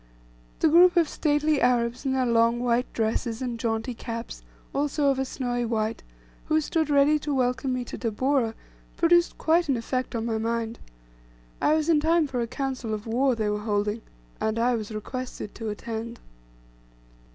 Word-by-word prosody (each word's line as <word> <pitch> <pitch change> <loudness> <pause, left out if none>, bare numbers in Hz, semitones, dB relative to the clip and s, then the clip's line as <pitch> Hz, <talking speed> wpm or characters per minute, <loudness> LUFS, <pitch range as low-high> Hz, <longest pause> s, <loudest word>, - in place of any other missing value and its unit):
The - - +5
group 350 +3 +6
of 335 -2 +5
stately 295 0 +1
Arabs 245 +1 +1
in 265 - +1
their 260 -1 +1
long 235 0 +3
white 245 0 0
dresses, 225 +1 -1
and 245 -3 -4
jaunty 225 +2 -1
caps, 230 0 -6 0.3
also 285 0 +1
of 265 - -2
a 265 - 0
snowy 245 -2 -2
white, 225 -1 -1 0.4
who 310 0 +2
stood 315 0 -1
ready 290 +1 +4
to 295 - -4
welcome 255 +1 0
me 250 -1 -2
to - - -7
Tabora, 235 0 0 0.4
produced 345 +1 +3
quite 330 0 +2
an 265 - +2
effect 255 +2 -3
on 225 0 -2
my 225 -1 -1
mind. 230 0 -2 0.8
I 305 - +4
was 310 0 0
in 325 -3 +4
time 325 +1 +3
for 255 -4 -2
a 235 - -1
council 255 -3 -3
of 210 - -8
war 250 +3 +2
they 215 -2 -1
were 210 - -1
holding 210 +1 -1 0.4
and 220 +1 -1
I 240 +2 +2
was 220 -2 -3
requested 230 0 -6
to 225 -1 -5
attend. 225 +2 -5
245 Hz, 175 wpm, -26 LUFS, 230-285 Hz, 0.8 s, group